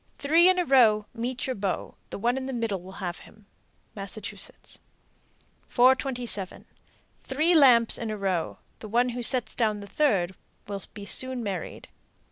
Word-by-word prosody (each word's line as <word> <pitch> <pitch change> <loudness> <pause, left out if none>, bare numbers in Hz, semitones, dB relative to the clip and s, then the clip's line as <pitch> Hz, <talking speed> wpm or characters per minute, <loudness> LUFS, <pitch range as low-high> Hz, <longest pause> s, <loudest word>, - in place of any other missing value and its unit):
Three 330 +5 +5
in 370 - +3
a 360 - +1
row, 225 -7 +4
Meet 245 +2 -3
your 260 - -2
beau. 195 -2 -3 0.2
The - - -6
one 235 +5 +1
in 265 0 -4
the 265 - -4
middle 225 -6 -2
will 190 +2 -11
have 175 -1 -4
him. 215 -1 -18 0.5
Massachusetts. 200 +1 -6 0.9
427. 245 -6 +1 0.5
Three 310 +6 +1
lamps 250 -7 +6
in 230 - -4
a 215 - -3
row, 190 -4 -2 0.2
the 215 - -8
one 240 +3 +2
who 245 0 -4
sets 245 0 +1
down 215 -3 0
the 200 - -8
third 200 -6 +1 0.3
will 200 -1 -5
be 205 -2 -8
soon 260 +3 +1
married. 195 -5 -5
230 Hz, 160 wpm, -26 LUFS, 200-260 Hz, 0.9 s, lamps